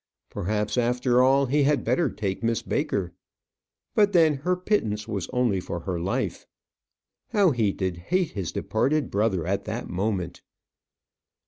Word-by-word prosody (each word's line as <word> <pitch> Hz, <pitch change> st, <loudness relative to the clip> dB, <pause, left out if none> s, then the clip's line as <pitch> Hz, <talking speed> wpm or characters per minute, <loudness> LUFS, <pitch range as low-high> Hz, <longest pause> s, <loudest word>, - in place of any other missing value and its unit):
Perhaps, 105 Hz, +3 st, -1 dB
after 125 Hz, +1 st, +2 dB
all, 135 Hz, +2 st, +4 dB
he 145 Hz, +3 st, +2 dB
had 145 Hz, +1 st, +2 dB
better 170 Hz, -5 st, +1 dB
take 95 Hz, -4 st, -3 dB
Miss 115 Hz, -1 st, 0 dB
Baker. 90 Hz, -3 st, -1 dB, 0.8 s
But 205 Hz, -1 st, +3 dB
then 160 Hz, -5 st, +5 dB
her 180 Hz, +7 st, 0 dB
pittance 115 Hz, -, -1 dB
was 100 Hz, -5 st, -3 dB
only 120 Hz, -6 st, +1 dB
for 85 Hz, -1 st, -5 dB
her 90 Hz, -1 st, -3 dB
life. 90 Hz, +4 st, -2 dB, 0.8 s
How 200 Hz, -5 st, +4 dB
he 110 Hz, -6 st, +1 dB
did 95 Hz, -3 st, -3 dB
hate 175 Hz, -, 0 dB
his 95 Hz, -5 st, -4 dB
departed 140 Hz, +7 st, 0 dB
brother 100 Hz, -5 st, +1 dB
at 95 Hz, +2 st, -1 dB
that -, -, -4 dB
moment! 90 Hz, -2 st, -2 dB
110 Hz, 145 wpm, -25 LUFS, 95-140 Hz, 0.8 s, then